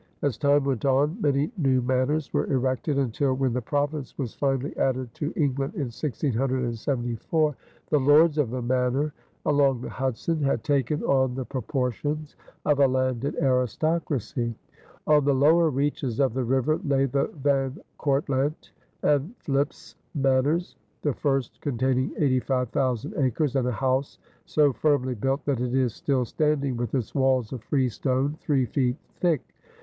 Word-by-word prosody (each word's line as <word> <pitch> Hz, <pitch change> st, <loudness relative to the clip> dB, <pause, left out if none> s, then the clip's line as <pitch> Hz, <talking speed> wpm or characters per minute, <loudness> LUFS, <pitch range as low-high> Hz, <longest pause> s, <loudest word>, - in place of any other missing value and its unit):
As 140 Hz, -5 st, +1 dB
time 145 Hz, +2 st, +3 dB
went 135 Hz, -4 st, -1 dB
on, 145 Hz, -, +2 dB
many 145 Hz, +3 st, +1 dB
new 135 Hz, -4 st, +3 dB
manors 130 Hz, +4 st, 0 dB
were -, -, 0 dB
erected 130 Hz, +2 st, 0 dB
until, 135 Hz, 0 st, +1 dB
when 130 Hz, -2 st, 0 dB
the 125 Hz, -, -1 dB
province 145 Hz, +1 st, -2 dB
was 125 Hz, -5 st, -3 dB
finally 135 Hz, 0 st, -1 dB
added 130 Hz, -2 st, -1 dB
to 150 Hz, +1 st, -3 dB
England 140 Hz, -2 st, -1 dB
in 130 Hz, -5 st, -3 dB
1674, 130 Hz, +2 st, -1 dB, 0.4 s
"The 150 Hz, -, +4 dB
Lords 150 Hz, +3 st, +5 dB
of 140 Hz, -6 st, +2 dB
the 125 Hz, +1 st, -3 dB
Manor" 130 Hz, +4 st, 0 dB, 0.3 s
along 140 Hz, -4 st, +3 dB
the -, -, -5 dB
Hudson 135 Hz, +5 st, -2 dB
had 140 Hz, -1 st, 0 dB
taken 145 Hz, 0 st, 0 dB
on 130 Hz, -2 st, +2 dB
the 130 Hz, -1 st, -3 dB
proportions 140 Hz, +3 st, -3 dB, 0.3 s
of 145 Hz, -2 st, +2 dB
a 140 Hz, -, +6 dB
landed 130 Hz, 0 st, 0 dB
aristocracy. 130 Hz, -2 st, 0 dB, 0.5 s
On 150 Hz, -1 st, +4 dB
the 140 Hz, 0 st, +3 dB
lower 160 Hz, +5 st, +5 dB
reaches 135 Hz, -4 st, -1 dB
of 135 Hz, -5 st, +2 dB
the 130 Hz, 0 st, -1 dB
river 135 Hz, +5 st, +1 dB
lay 135 Hz, -1 st, +2 dB
the 135 Hz, +1 st, 0 dB
Van 135 Hz, -2 st, 0 dB, 0.2 s
Cortlandt 140 Hz, +1 st, 0 dB, 0.3 s
and 150 Hz, -, +1 dB
Philipse 140 Hz, +1 st, -2 dB, 0.2 s
Manors, 140 Hz, +5 st, +1 dB, 0.3 s
the 145 Hz, -, +1 dB
first 135 Hz, -2 st, -1 dB
containing 130 Hz, -1 st, 0 dB
85,000 130 Hz, -, 0 dB
acres 140 Hz, 0 st, +1 dB
and 130 Hz, -2 st, +1 dB
a -, -, +1 dB
house 130 Hz, +3 st, -1 dB, 0.3 s
so 145 Hz, -3 st, +3 dB
firmly 135 Hz, -3 st, +1 dB
built 135 Hz, +5 st, -1 dB
that 135 Hz, -4 st, 0 dB
it 125 Hz, 0 st, -1 dB
is 130 Hz, -4 st, +2 dB
still 130 Hz, -2 st, 0 dB
standing 140 Hz, -1 st, 0 dB
with 120 Hz, +2 st, -2 dB
its 120 Hz, -6 st, -2 dB
walls 130 Hz, -4 st, +1 dB
of 125 Hz, -, -6 dB
freestone, 130 Hz, +1 st, 0 dB
three 135 Hz, -4 st, +1 dB
feet 125 Hz, +2 st, 0 dB, 0.2 s
thick. 170 Hz, -4 st, +1 dB
135 Hz, 150 wpm, -26 LUFS, 130-145 Hz, 0.5 s, a